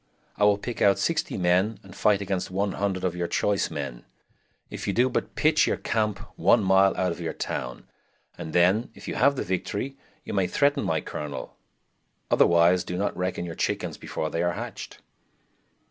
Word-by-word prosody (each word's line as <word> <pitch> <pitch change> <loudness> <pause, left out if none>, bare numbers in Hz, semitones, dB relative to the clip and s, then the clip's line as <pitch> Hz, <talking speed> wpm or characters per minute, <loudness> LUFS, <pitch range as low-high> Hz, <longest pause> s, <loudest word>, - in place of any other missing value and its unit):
I 105 - +3
will 105 -1 +5
pick 120 +3 -6
out 100 -1 +5
60 165 - -1
men 95 +4 +2
and 95 -2 -13
fight 100 -2 +3
against 95 -2 -2
100 95 0 -1
of 90 -2 0
your 90 -1 -2
choise 100 +2 0
men, 70 -6 -5 0.7
if - - -6
you 100 - +1
do 125 +4 +3
but 125 - -3
pitch 155 0 +3
your - - 0
campe 105 -3 -1 0.2
one - - +4
mile 95 0 +4
out 90 -1 +1
of 85 - -6
your 85 - -3
towne, 60 - -5 0.5
and 80 - -7
then, 95 - +3
if - - -12
you - - -3
have 140 - +3
the - - -2
victory, 100 +8 -3 0.3
you - - -6
may 95 -3 +2
threaten 145 +4 +2
my 80 -1 0
colonel; 75 -2 -6 0.8
otherwise 85 +1 +5
do 90 - -4
not 100 +2 -1
reckon 90 -1 -2
your 85 - -5
chickens - - -2
before 80 -1 -4
they 85 - -2
be - - +1
hatched." 85 - -6
95 Hz, 185 wpm, -26 LUFS, 90-105 Hz, 0.8 s, will